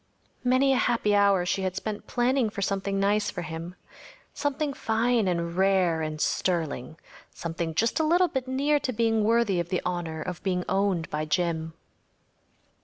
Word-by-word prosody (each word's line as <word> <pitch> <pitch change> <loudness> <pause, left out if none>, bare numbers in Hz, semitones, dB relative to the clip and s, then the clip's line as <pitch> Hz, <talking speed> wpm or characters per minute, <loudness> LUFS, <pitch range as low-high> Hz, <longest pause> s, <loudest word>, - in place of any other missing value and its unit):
Many 260 +2 +3
a - - +2
happy 230 -4 +1
hour 200 -3 +4
she 190 - 0
had 185 -1 -2
spent 205 +1 -5
planning 245 -1 +1
for 200 -1 -4
something 195 0 -1
nice 205 +1 +2
for 180 - -5
him. 165 +2 -6 0.6
Something 290 0 -1
fine 225 -2 +1
and 170 -1 -1
rare 185 -3 +2
and 155 -1 -4
sterling‚ÄĒsomething 165 +1 -3
just 230 - +1
a - - +3
little 350 +4 +4
bit 265 -5 -3
near 285 +3 +1
to 260 - -2
being 225 -1 +1
worthy 220 -4 +2
of 170 0 -3
the 185 - 0
honor 175 -3 -3
of 180 -1 -6
being 180 -2 -1
owned 190 -4 0
by 150 +1 -2
Jim. 160 0 -1
195 Hz, 165 wpm, -27 LUFS, 170-235 Hz, 0.6 s, hour